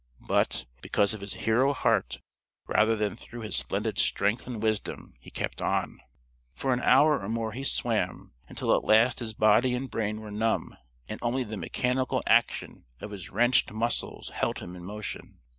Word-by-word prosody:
But, - - +1 0.2
because 100 +2 +2
of 110 - -7
his 100 0 -3
hero 125 +5 +3
heart 65 - 0 0.4
rather 110 +1 +3
than 105 -1 -1
through 120 0 -10
his 110 - -1
splendid 60 0 -1
strength 105 +5 +1
and 120 -3 -5
wisdom, 110 -1 -2
he - - -13
kept - - -4
on. - - -1 0.5
For 130 - 0
an 125 - 0
hour 145 +3 +5
or 95 - -6
more 115 -1 -2
he 130 +5 -6
swam 135 - -1
until - - +1
at - - -1
last 115 +4 +4
his 110 -3 -4
body 110 +4 +4
and 130 +1 -4
brain 105 -1 -2
were 110 -1 -9
numb, 110 +2 -1 0.3
and 110 - -6
only 125 +2 0
the 110 -2 -6
mechanical 125 +4 -1
action - - +1
of 105 - -7
his 100 -4 -7
wrenched 120 +5 +3
muscles 115 +2 -2
held - - -1
him 90 - -8
in 90 - -10
motion. 105 +3 -7
110 Hz, 175 wpm, -28 LUFS, 105-125 Hz, 0.5 s, hour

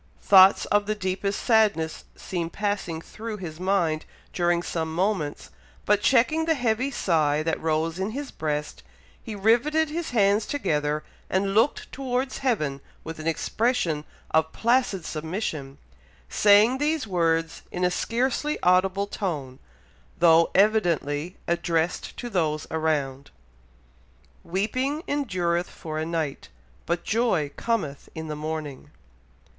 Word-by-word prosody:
Thoughts 190 0 +7
of 205 0 +1
the 215 - 0
deepest 195 0 -2
sadness 210 -9 +2
seemed 170 -2 -4
passing 200 -6 -2
through 220 +4 -7
his 165 -4 -7
mind 180 -5 0 0.3
during 175 -1 +1
some 160 -2 -3
moments, 180 -5 -1 0.3
but 210 0 +3
checking 295 +7 +3
the 325 0 +2
heavy 245 0 0
sigh 155 - +1
that 165 0 -1
rose 160 +2 0
in 190 +2 -1
his 275 +4 -5
breast, 150 - -3 0.4
he 220 - -7
riveted 245 +10 +2
his 330 +2 -3
hands 210 -2 +2
together, 150 - -1 0.3
and 195 +1 0
looked 225 +7 +1
towards 260 0 -2
heaven 155 - -1 0.2
with 160 0 -7
an 155 - -5
expression 170 -2 0 0.3
of 160 0 +2
placid 235 -7 +1
submission, 155 -4 -4 0.5
saying 210 - +5
these 300 -1 0
words 165 -4 0
in 180 - -3
a 180 - +2
scarcely 260 +9 -1
audible 185 +2 +3
tone, 150 -11 -4 0.6
though 165 -1 +5
evidently 175 -6 +2
addressed 170 -1 -1
to 245 - -5
those 155 -8 -1
around, 145 -4 -1 1.1
"Weeping 255 - -1
endureth 180 -11 -1
for 155 -2 -6
a 160 - -2
night, 160 -4 -3 0.4
but 170 0 -1
joy 215 -11 +1
cometh 190 -12 -2
in 160 -1 -6
the 150 - -3
morning." 150 -2 -5
185 Hz, 130 wpm, -25 LUFS, 160-220 Hz, 1.1 s, Thoughts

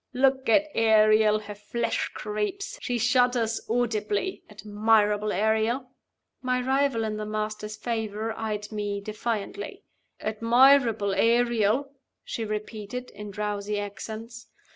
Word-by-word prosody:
Look 265 0 +2
at 295 +7 +5
Ariel! 215 -1 +5
Her 205 0 -8
flesh 210 +3 -2
creeps; 215 - -3
she 245 - -1
shudders 245 -1 +2
audibly. 225 - -1
Admirable 210 0 +1
Ariel!" 220 +5 0 0.5
My 255 -1 0
rival 265 -2 +1
in 215 -1 -2
the 215 - -4
Master's 215 0 -3
favor 220 -1 -3
eyed 210 -1 -4
me 205 -1 -2
defiantly. 215 - -4 0.4
"Admirable 230 -1 +4
Ariel!" 235 +4 +2 0.3
she 230 - -4
repeated, 215 +3 -5
in 210 0 -8
drowsy 205 0 -3
accents. 220 +3 -7
220 Hz, 110 wpm, -26 LUFS, 210-240 Hz, 0.5 s, at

